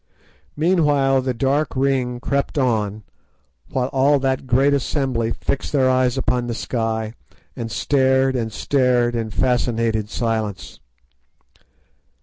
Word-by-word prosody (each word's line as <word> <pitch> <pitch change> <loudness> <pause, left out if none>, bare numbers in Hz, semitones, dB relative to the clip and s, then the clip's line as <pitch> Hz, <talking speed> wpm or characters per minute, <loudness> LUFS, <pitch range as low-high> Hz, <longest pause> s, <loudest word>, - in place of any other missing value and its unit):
Meanwhile 145 -5 +2
the 130 0 -2
dark 140 +5 0
ring 130 -2 0
crept 140 +4 -2
on, 110 -5 0 0.7
while 130 -1 -1
all 140 +2 +3
that 130 -1 -1
great 135 +3 +3
assembly 130 -4 -1
fixed 140 - -3
their 135 -3 +3
eyes 130 0 +1
upon 125 -2 0
the 120 - -3
sky 110 -2 -2 0.4
and 115 -2 -5
stared 130 +2 +2
and 115 -3 -2
stared 125 -1 +1
in 115 -1 -2
fascinated 115 -3 0
silence. 110 -10 -3
125 Hz, 120 wpm, -21 LUFS, 115-135 Hz, 0.7 s, all